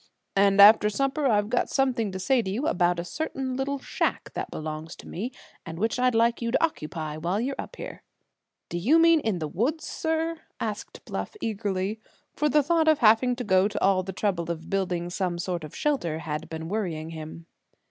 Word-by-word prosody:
"And 200 0 +4
after 210 +1 +8
supper 275 +6 0
I've 205 -4 +2
got 245 - +1
something 250 -6 +1
to 190 - -5
say 250 +6 +2
to 190 - -4
you 230 +9 -2
about 175 - +2
a - - -2
certain 270 - -3
little 275 +2 -1
shack 270 - -2
that - - -4
belongs 155 +1 -6
to - - -13
me, 230 +8 -4 0.3
and 165 0 -7
which 225 +6 0
I'd 250 -1 +3
like 230 +1 +3
you 235 - -1
to 250 - +1
occupy 155 - -5
while 175 +6 -1
you're 260 +4 -1
up - - -6
here." - - -8 0.7
"Do 175 - -3
you 265 - +4
mean 330 0 +6
in 220 -9 -1
the 155 -2 -3
woods, 255 - -1
sir?" 320 0 -2 0.2
asked 215 -2 -5
Bluff - - -5
eagerly, 205 - -2 0.3
for 300 +1 +1
the 295 +1 +4
thought 325 +2 +2
of 310 -1 +6
having 235 +2 +4
to 250 - -4
go 190 -2 +4
to 210 - -4
all 195 -1 +3
the 190 +1 -6
trouble 185 -4 -1
of 165 -1 -5
building 180 -3 -1
some 180 -2 -1
sort 175 -1 -3
of 155 - -9
shelter 260 - 0
had 150 -1 -5
been 160 0 -5
worrying 165 -6 -3
him. 160 +1 -8
205 Hz, 205 wpm, -26 LUFS, 175-260 Hz, 0.7 s, after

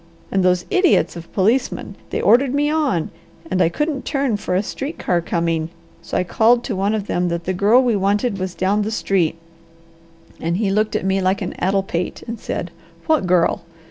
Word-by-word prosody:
And 190 -1 +1
those 180 -1 +2
idiots 370 - +3
of 170 0 -10
policemen! 225 +7 0 0.2
They - - -2
ordered 260 +2 +4
me 295 +1 +1
on, 285 - 0 0.4
and 185 0 +1
I 165 - +4
couldn't 295 - -2
turn 275 -5 0
for 190 -3 -2
a 190 - +2
street 275 +9 -5
car 175 -1 0
coming, 165 -1 -1 0.3
so - - -3
I - - +2
called 230 +6 +3
to 230 - -3
one 200 +3 0
of 210 -2 -3
them 180 -3 0
that 170 0 -3
the 185 - -2
girl 210 +8 +4
we 240 -3 +2
wanted 200 +2 0
was 185 -1 -4
down 200 +3 +1
the 210 - -1
street, 190 -7 0 1.0
and 170 +2 -1
he 200 -2 0
looked 215 +1 +1
at - - -1
me 195 0 +1
like 190 +2 +1
an 180 - -4
addle 195 +2 +1
pate 175 -2 -4
and 230 -1 -6
said, - - -4 0.3
'What 315 - +2
girl? 175 +1 +2
195 Hz, 205 wpm, -20 LUFS, 180-240 Hz, 1.0 s, ordered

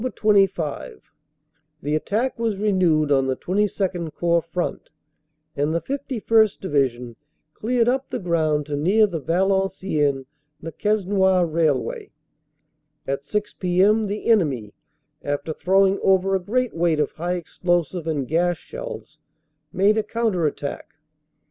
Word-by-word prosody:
25 195 - 0 0.7
The 145 +2 -1
attack 225 +11 -1
was 225 -4 -1
renewed 180 -7 +2
on 135 -1 +3
the 130 - 0
XXII 190 -3 -1
Corps 170 +2 +1
front 170 +2 -4 0.7
and 145 +3 0
the - - +2
5 280 +8 -5
1st. 220 -4 +2
Division 125 -8 -1 0.4
cleared 235 +1 0
up 265 +2 0
the - - -3
ground 160 -6 0
to 145 0 -4
near 190 +9 +3
the 170 -6 -4
Valen 190 +4 +1
ciennes 145 -8 -1 0.3
Le 165 - -7
Quesnoy 190 -2 +2
railway. 160 -5 -1 1.0
At 140 +1 -3
6 210 +5 -2
p.m. 200 +4 +2
the 205 +1 -5
enemy, 145 - +1 0.5
after 145 +2 -3
throwing 195 +3 +2
over 190 0 +3
a 190 - +2
great 240 +7 -1
weight 165 -2 +1
of 150 - 0
high 175 +3 -3
explosive 175 -1 -2
and 145 -5 -1
gas 175 +3 +1
shells, - - -9 0.5
made 200 +5 +3
a - - 0
counter 210 -7 0
attack. 145 - -6
180 Hz, 135 wpm, -23 LUFS, 155-210 Hz, 1.0 s, on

